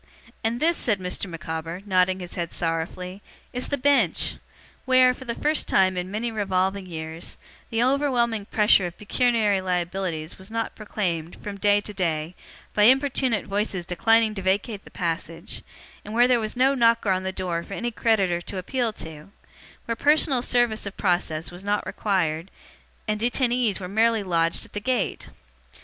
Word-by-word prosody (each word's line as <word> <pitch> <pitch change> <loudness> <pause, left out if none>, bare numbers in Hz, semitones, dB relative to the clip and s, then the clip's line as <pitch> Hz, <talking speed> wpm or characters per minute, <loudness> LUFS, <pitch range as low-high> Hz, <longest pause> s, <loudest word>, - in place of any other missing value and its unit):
And 230 +2 0
this,' 335 +3 +2
said 210 -5 +1
Mr. 180 +2 -2
Micawber, 165 +2 -5
nodding 185 -1 +2
his 175 - -7
head 170 -3 -3
sorrowfully, 175 +3 -3 0.3
'is 250 0 -2
the 285 - -1
Bench! 285 +1 +2 0.5
Where, 255 -1 +5
for 260 - -11
the 235 -1 -3
first 300 +1 0
time 185 -1 +3
in 180 0 -3
many 225 +4 -2
revolving 195 -2 0
years, 160 -1 -6 0.3
the 225 +1 +1
overwhelming 245 -5 +1
pressure 210 -3 +4
of 175 - -10
pecuniary 215 -2 +2
liabilities 180 -3 -2
was 190 +2 -10
not 225 0 -2
proclaimed, 175 -6 -3
from 200 -1 -6
day 205 +1 +4
to 210 - -6
day, 165 -3 -1 0.4
by 210 - +4
importune 260 -2 +3
voices 200 -3 -2
declining 220 +5 +3
to 195 - -5
vacate 195 +2 -1
the - - -12
passage; 170 -1 -4 0.4
where 235 +4 +3
there 250 -1 +4
was 215 +1 -3
no 265 +2 +4
knocker 230 -5 +3
on 185 0 +1
the 190 0 -2
door 180 -3 -2
for 195 - -7
any 240 0 -2
creditor 195 -7 +1
to 190 - -6
appeal 235 +5 -1
to; 160 -3 -9 0.6
where 230 - -1
personal 290 -1 +3
service 240 -4 +1
of 200 - -8
process 175 -4 0
was 175 +2 -9
not 205 +1 0
required, 175 -4 -1 0.6
and 210 0 0
detainees 240 -2 +1
were 185 - -5
merely 220 +2 +2
lodged 165 -3 +1
at - - -19
the 205 - -2
gate! 250 -1 -1
205 Hz, 165 wpm, -25 LUFS, 180-235 Hz, 0.6 s, Where